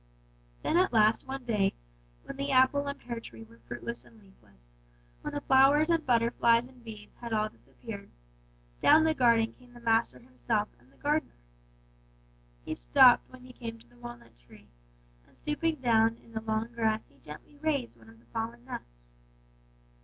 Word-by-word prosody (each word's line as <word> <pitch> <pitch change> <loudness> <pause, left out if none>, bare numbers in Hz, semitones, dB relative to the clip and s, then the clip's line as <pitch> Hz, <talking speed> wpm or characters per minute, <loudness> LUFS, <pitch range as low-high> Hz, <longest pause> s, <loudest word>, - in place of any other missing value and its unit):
"And - - 0
then 365 - +6
at - - -3
last 220 0 +3
one 270 0 -5
day, 210 -5 +1 0.5
when - - -8
the 275 +1 -3
apple 270 +2 +3
and 280 - -4
pear 235 -1 -6
tree 115 - -11
were 115 +1 -18
fruitless 125 - -6
and 225 - -19
leafless, 105 - -24 0.5
when - - -5
the 290 - -4
flowers 280 +4 +5
and 330 -1 +2
butterflies 235 0 +3
and 255 -2 -19
bees 215 -2 -10
had 235 -1 -5
all 215 0 +1
disappeared, 215 -2 -11 0.7
down 315 - +7
the 320 0 +3
garden 235 -5 +3
came 245 -1 -20
the - - -11
master 225 - +1
himself 130 - -2
and 125 +2 -25
the 135 - -26
gardener. 300 +2 -1 1.3
"He - - -3
stopped - - +5
when 255 -1 -14
he 255 0 -13
came 230 -2 -7
to - - -21
the 120 0 -23
walnut 120 - -11
tree, - - -19 0.6
and - - -26
stooping 320 +2 -1
down 230 -4 +3
in 230 - -20
the 220 -1 -4
long 220 +1 -2
grass 220 -2 0
he 140 - -26
gently 150 - -12
raised 285 -5 -1
one 110 -1 -18
of 115 - -17
the 115 - -24
fallen 230 - -5
nuts. - - -8
230 Hz, 180 wpm, -30 LUFS, 195-260 Hz, 1.3 s, down